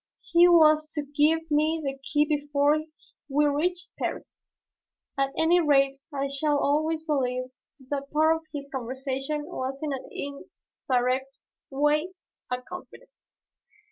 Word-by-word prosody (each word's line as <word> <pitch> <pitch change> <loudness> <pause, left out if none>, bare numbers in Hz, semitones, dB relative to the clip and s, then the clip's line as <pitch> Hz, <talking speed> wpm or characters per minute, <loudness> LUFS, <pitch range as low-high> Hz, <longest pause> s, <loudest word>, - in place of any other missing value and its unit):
He 345 +1 +7
was 310 -3 +5
to 295 - -2
give 300 +3 +1
me 310 +2 +2
the 270 -1 -2
key 295 +2 +1
before 295 0 +1 0.5
we 295 +2 +3
reached 345 +5 -1
Paris. - - -5 0.7
At 275 -1 +1
any 335 +2 +4
rate 275 -4 +3
I 280 -1 -2
shall 290 +2 +1
always 310 +3 +1
believe 255 -4 -1 0.4
that 280 -1 -3
part 315 +1 +3
of - - -12
his 280 -2 -6
conversation 270 +3 -3
was 270 -5 -4
in 295 -2 -1
an 265 - -6
indirect 265 -1 -3 0.3
way 295 +5 +1 0.4
a 250 0 -3
confidence. - - -13
290 Hz, 130 wpm, -26 LUFS, 275-310 Hz, 0.7 s, He